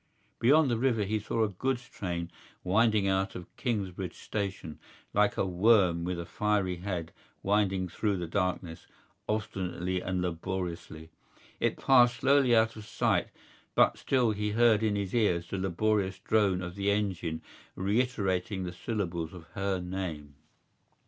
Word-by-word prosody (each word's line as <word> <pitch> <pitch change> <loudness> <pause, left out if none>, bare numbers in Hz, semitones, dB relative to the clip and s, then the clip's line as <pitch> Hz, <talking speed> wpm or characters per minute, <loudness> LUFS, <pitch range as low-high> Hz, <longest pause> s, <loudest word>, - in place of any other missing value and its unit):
Beyond 140 +3 +5
the 115 - 0
river 120 -4 +2
he 105 +2 -1
saw 110 +2 -1
a - - +2
goods 125 +5 -2
train 85 -6 -4 0.3
winding 105 +1 +3
out 95 0 0
of 90 - -9
Kingsbridge 95 - -3
Station, 95 -7 -4 0.3
like 105 0 +2
a - - +1
worm 90 -2 +3
with 90 -1 -2
a 85 - -4
fiery 95 +1 0
head 90 -3 -4 0.3
winding 95 -2 +1
through 100 +3 -1
the 90 - -3
darkness, 90 -2 -2 0.4
obstinately 95 -4 -2
and 95 0 -2
laboriously. 85 -2 -4 0.5
It - - 0
passed 120 -3 +5
slowly 135 0 +4
out 110 0 +3
of 110 -1 -10
sight; 115 -5 +1 0.5
but - - +5
still 125 -4 +1
he 105 0 -2
heard 115 -1 +4
in 110 -2 +1
his 100 -2 -3
ears 90 -8 +2
the 100 - -2
laborious 95 +1 0
drone 95 -2 +1
of 90 0 -5
the 100 +1 -1
engine 95 -6 -1 0.3
reiterating 100 -2 0
the 90 -1 -5
syllables 85 -5 -3
of 90 - -10
her 100 -2 -1
name. 90 -5 -5
95 Hz, 150 wpm, -30 LUFS, 90-110 Hz, 0.5 s, Beyond